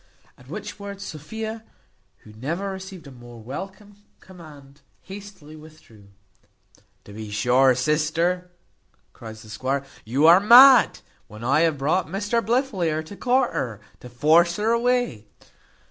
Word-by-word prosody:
At - - -20
which - - -8
words 200 -1 -8
Sophia, 220 +8 -7 0.6
who 105 - -15
never 165 - -4
received 190 -3 -9
a 140 - -12
more 120 -2 -13
welcome 190 - -9 0.2
command, 150 -6 -15 0.2
hastily 195 -6 -12
withdrew. 150 -10 -17 1.0
"To 100 - -14
be 110 0 -8
sure, 125 +5 +3
sister," 160 +6 -1 0.6
cries 110 0 -11
the 110 - -15
squire, 130 +5 -3 0.2
"you 130 +7 0
are 170 +3 +8
mad, 245 +5 +7 0.3
when 105 +2 -12
I 135 +5 +2
have 160 -2 +1
brought 155 +6 0
Mr 205 +6 -2
Blifil 240 -2 -1
here 160 -2 -1
to 180 +6 -11
court 250 +3 0
her, 115 -5 -4 0.2
to 125 - -12
force 160 +8 +3
her 215 +2 0
away." 235 - 0
160 Hz, 140 wpm, -23 LUFS, 130-200 Hz, 1.0 s, are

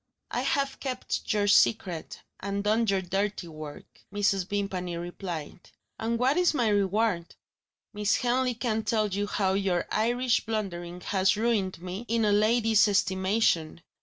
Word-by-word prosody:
"I - - -1
have 275 -1 0
kept 255 -2 -3
your 205 -2 +1
secret, 195 -4 +2 0.2
and 200 0 -3
done 220 +2 +2
your 195 -2 +1
dirty 195 +1 -2
work," 155 -2 -10
Mrs. 200 -2 +1
Vimpany 190 -4 -3
replied. 175 -2 -6 0.3
"And 230 +1 -1
what 260 +6 +2
is 355 -3 +3
my 235 -5 +2
reward? 200 -3 0 0.6
Miss 210 0 +1
Henley 250 0 +1
can 225 -2 -1
tell 215 -2 +1
you 200 +1 -2
how 190 -2 0
your 190 -3 0
Irish 240 +2 +1
blundering 180 -5 -4
has 190 +1 +1
ruined 210 -6 0
me 185 +5 -5
in 230 0 +1
a 210 - +3
lady's 220 +1 +4
estimation. 190 -4 +1
205 Hz, 145 wpm, -28 LUFS, 185-225 Hz, 0.6 s, lady's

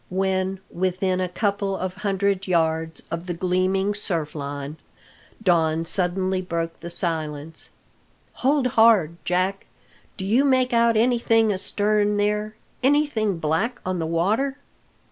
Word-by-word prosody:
When 190 0 -1
within 185 +1 -1
a 185 - -1
couple 200 +1 -1
of 185 0 -3
hundred 195 -1 -1
yards 160 -2 0
of 170 +2 -4
the 175 - -3
gleaming 185 +3 0
surfline, 150 -6 -3 0.7
Don 165 -3 +2
suddenly 185 +1 +3
broke 170 -2 -4
the 170 - -7
silence. 160 -3 -3 0.7
"Hold 275 +1 +2
hard, 220 -9 +4
Jack! 185 +2 -1 0.5
Do 190 - -5
you 230 +8 +3
make 255 -3 +2
out 230 -1 +3
anything 225 -2 +3
astern 205 +2 +1
there 210 +1 -1 0.3
anything 260 - +1
black 165 +10 -1
on 185 -1 -2
the 160 - -2
water?" 215 - 0
190 Hz, 125 wpm, -23 LUFS, 170-215 Hz, 0.7 s, hard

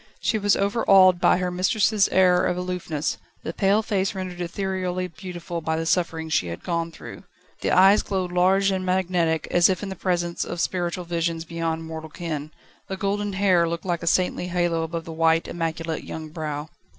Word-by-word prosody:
She 220 - 0
was 205 -1 +3
overawed 195 -3 +4
by - - +5
her 180 0 -1
mistress' 200 +3 +2
air 180 -1 +4
of 180 - -1
aloofness, 180 -4 -3 0.2
the 165 - -4
pale 200 +3 +2
face 200 -1 -1
rendered 185 -2 -5
ethereally 185 0 -2
beautiful 175 -1 -7
by 160 0 -1
the 165 - -2
sufferings 165 -2 0
she 90 - +2
had 85 0 -7
gone 170 -1 -2
through. - - -10 0.4
The - - -1
eyes 195 +3 +6
glowed 185 -2 -2
large 190 +2 +3
and 190 -1 -1
magnetic, 180 -3 0
as 175 +1 +5
if 185 +1 -1
in 195 -1 -4
presence 175 -1 -1
of 175 - -5
spiritual 175 0 -2
visions 165 -1 -2
beyond 165 -1 -3
mortal 160 -1 -7
ken; 155 -2 -5 0.4
the 190 - -4
golden 205 +1 -1
hair 185 -4 +3
looked 170 +1 -4
like 175 -2 -1
a 170 - -5
saintly 180 +1 +1
halo 175 -2 0
above 165 0 -4
the 165 - -7
white, 165 0 +2
immaculate 165 -1 -3
young 160 -1 -7
brow. 155 -1 -5
175 Hz, 185 wpm, -24 LUFS, 165-190 Hz, 0.4 s, eyes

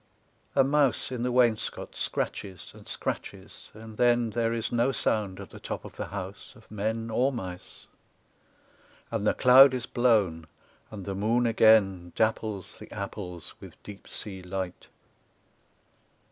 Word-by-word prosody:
A 135 - +6
mouse 140 -2 +2
in 125 -2 -3
the 125 +1 0
wainscot 120 -3 +1
scratches, 95 -3 -4
and - - -15
scratches, - - -5
and 110 0 -11
then 120 -2 +3
There 115 0 0
is 115 -1 -2
no 120 +3 +2
sound 105 -7 -1
at - - -9
the - - -11
top - - -6
of - - -11
the - - -5
house 100 +4 -7
of 115 -3 -19
men 110 +2 -2
Or 125 +5 +2
mice; 95 -8 -8 1.3
and 110 -2 -1
the - - +3
cloud 130 +1 +8
is 125 -1 -3
blown, 105 -12 +2 0.4
and 100 -4 -8
the 100 - -3
moon 110 +5 +1
again 105 -6 +4
Dapples 110 -3 -1
the - - -12
apples 90 -4 -6
with - - -12
deep 100 -1 -11
sea 95 -3 -5
light. 90 0 -5
110 Hz, 145 wpm, -28 LUFS, 95-120 Hz, 1.3 s, cloud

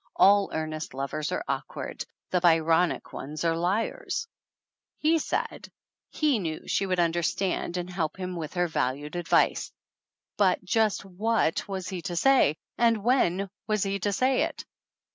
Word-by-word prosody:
"All 200 0 +5
earnest 155 -3 -4
lovers 140 +3 -3
are - - -2
awkward. - - -4 0.3
The 180 - +3
Byronic 165 0 +3
ones 150 +4 -5
are 165 0 +2
liars 210 - -1 0.4
!" - - -66
He 325 +1 +5
said - - -3 0.4
he 295 -7 +1
knew 160 -4 -4
she 195 - 0
would 185 -1 0
understand 175 +2 0
and 175 0 -3
help 175 -3 -3
him 185 -1 -4
with 165 0 -6
her 175 0 +2
valued 145 0 -2
advice! 175 -1 +2 0.7
But, 190 -3 +3
just 215 0 +1
what 195 -2 0
was 190 -2 -4
he 185 -3 -4
to 175 -1 -4
say? 250 - +4 0.2
And 230 -3 +3
when 200 -6 +2 0.2
was 215 -2 +1
he 200 0 -1
to 205 +2 0
say 255 +6 +2
it? - - -2
180 Hz, 155 wpm, -27 LUFS, 165-205 Hz, 0.7 s, All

